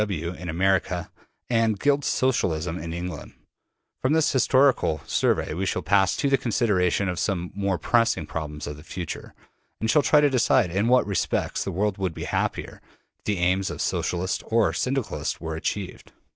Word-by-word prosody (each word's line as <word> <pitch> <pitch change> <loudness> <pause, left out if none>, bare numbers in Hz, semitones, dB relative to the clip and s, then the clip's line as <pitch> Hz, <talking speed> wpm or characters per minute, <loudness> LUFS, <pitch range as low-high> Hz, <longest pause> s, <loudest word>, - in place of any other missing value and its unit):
W. 100 -6 -1
W. 90 - -9
in 90 - -5
America 90 0 0 0.4
and 115 -4 +1
Guild 145 +3 +2
Socialism 90 -12 0
in 80 +1 -6
England. 90 +1 -6 0.7
From 130 +3 +2
this 160 -1 +3
historical 130 - +3
survey - - +1
we 95 +4 -2
shall 90 - -1
pass 95 +1 +3
to - - +1
the 135 -1 +3
consideration 100 -5 +1
of 90 -1 -2
some 95 -4 0
of - - -12
the 100 - -9
more 100 -2 +1
pressing 115 -1 +1
problems 75 -2 -5
of 75 0 -6
the 75 - -12
future, 90 -1 -7 0.4
and 110 0 +1
shall 150 - +5
try 150 - +4
to 145 - +5
decide 125 -6 +2
in 100 +5 +1
what 125 +1 +4
respects 100 -3 -1
the - - -3
world 100 +2 -1
would 95 -4 -2
be - - -5
happier - - -3 0.4
if - - -42
the 105 -2 0
aims 95 +2 +1
of - - -6
Socialists 90 +2 -1
or 115 -2 +2
Syndicalists 130 -2 -2
were 80 0 -4
achieved. 95 +3 -4
95 Hz, 185 wpm, -25 LUFS, 85-115 Hz, 0.7 s, shall